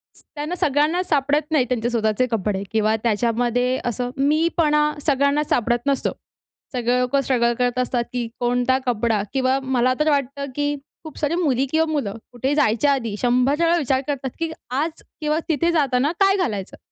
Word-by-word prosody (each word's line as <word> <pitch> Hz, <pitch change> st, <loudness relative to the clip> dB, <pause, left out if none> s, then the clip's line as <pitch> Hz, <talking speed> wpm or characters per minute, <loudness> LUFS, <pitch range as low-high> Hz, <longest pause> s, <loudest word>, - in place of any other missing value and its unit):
स -, -, -21 dB
त्यांना 300 Hz, +4 st, -3 dB
सगळ्यांनाच 300 Hz, +6 st, +1 dB
सापडत 290 Hz, +1 st, +1 dB
नाहीत 275 Hz, -5 st, +2 dB
त्यांचे 240 Hz, -2 st, 0 dB
स्वतःचे 220 Hz, 0 st, +1 dB
कपडे. 205 Hz, -3 st, -1 dB
किंवा 220 Hz, 0 st, +2 dB
त्याच्यामध्ये 240 Hz, +3 st, +1 dB
असं 245 Hz, +1 st, -2 dB
मीपणा 300 Hz, +1 st, +2 dB, 0.2 s
सगळ्यांनाच 280 Hz, +1 st, +2 dB
सापडत 240 Hz, 0 st, +1 dB
नसतो. 275 Hz, -1 st, +1 dB, 0.6 s
सगळे 245 Hz, 0 st, +1 dB
लोकं 250 Hz, +2 st, +1 dB
स्ट्रगल 240 Hz, -3 st, +1 dB
करत 245 Hz, 0 st, +1 dB
असतात, 250 Hz, -1 st, 0 dB
की 245 Hz, -2 st, -2 dB
कोणता 245 Hz, +1 st, +2 dB
कपडा, 230 Hz, -3 st, +1 dB
किंवा 265 Hz, 0 st, +2 dB
मला 255 Hz, -1 st, +2 dB
तर 305 Hz, -, +3 dB
वाटतं, 280 Hz, -1 st, -1 dB
की 290 Hz, 0 st, 0 dB, 0.3 s
खूप 315 Hz, -2 st, -10 dB
सारी 305 Hz, +2 st, 0 dB
मुली 275 Hz, -7 st, +1 dB
किंवा 320 Hz, 0 st, +3 dB
मुलं 265 Hz, -10 st, -2 dB, 0.2 s
कुठेही 260 Hz, +4 st, -1 dB
जायच्या 280 Hz, 0 st, +3 dB
आधी 230 Hz, -6 st, -2 dB
100 250 Hz, +3 st, +3 dB
वेळा 335 Hz, +1 st, +3 dB
विचार 265 Hz, -4 st, +1 dB
करतात, 275 Hz, -2 st, -2 dB
की 330 Hz, -1 st, -2 dB, 0.2 s
आज 300 Hz, +6 st, -2 dB, 0.2 s
किंवा 305 Hz, +1 st, +1 dB
तिथे 325 Hz, +3 st, +2 dB
जाताना 280 Hz, -2 st, +2 dB
काय 390 Hz, -1 st, +4 dB
घालायचं? 210 Hz, -, -3 dB
260 Hz, 165 wpm, -22 LUFS, 240-295 Hz, 0.6 s, काय